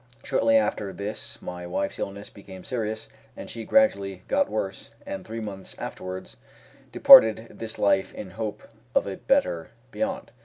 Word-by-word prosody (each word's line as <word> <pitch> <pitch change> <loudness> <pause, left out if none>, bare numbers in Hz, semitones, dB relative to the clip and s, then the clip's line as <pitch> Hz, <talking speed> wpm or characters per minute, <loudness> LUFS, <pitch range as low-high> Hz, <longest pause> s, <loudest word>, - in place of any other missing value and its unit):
Shortly 280 - +3
after 105 - 0
this 100 +2 -5
my 90 -1 -6
wife's 90 - -3
illness 100 +1 -5
became 95 -2 -12
serious, 110 -3 -3 0.3
and - - -7
she 115 -1 -6
gradually 100 - +2
got - - +2
worse, 100 -2 -4 0.2
and 95 -1 -5
three 115 +1 -6
months 100 -3 -7
afterwards 95 0 -7 0.5
departed 110 +1 +7
this 115 0 -5
life 95 -1 +2
in 95 - -7
hope 105 +1 -5 0.3
of - - +4
a 95 -1 -5
better 270 - +1 0.2
beyond. 275 0 -3
105 Hz, 150 wpm, -26 LUFS, 95-115 Hz, 0.5 s, departed